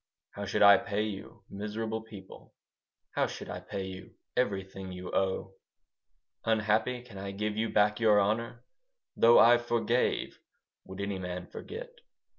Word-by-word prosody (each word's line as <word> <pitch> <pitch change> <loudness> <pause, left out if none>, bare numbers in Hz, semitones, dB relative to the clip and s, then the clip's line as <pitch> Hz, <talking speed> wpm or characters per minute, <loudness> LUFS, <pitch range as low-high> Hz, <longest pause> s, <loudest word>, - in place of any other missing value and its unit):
How 100 - -6
should 100 - +2
I 100 0 +9
pay 100 +1 -2
you, 105 +1 -7
miserable 110 +2 -4
people, 105 -4 -13 0.6
How - - +1
should - - -7
I 90 - -5
pay 95 +1 -5
you 95 0 -9 0.2
everything 95 -5 -2
you 90 0 -7
owe? 95 0 0 0.9
Unhappy, 110 +3 +1
can 110 -6 -11
I 100 0 -5
give 105 +2 -3
you 110 +1 0
back 105 +1 +3
your 110 -3 +5
honour? 115 +4 -1 0.5
Though 115 +1 +6
I 120 +1 +7
forgave, 120 +1 0 0.5
would 95 +1 -7
any 100 -1 -2
man 90 -1 -5
forget? 485 - -8
105 Hz, 145 wpm, -30 LUFS, 95-115 Hz, 0.9 s, I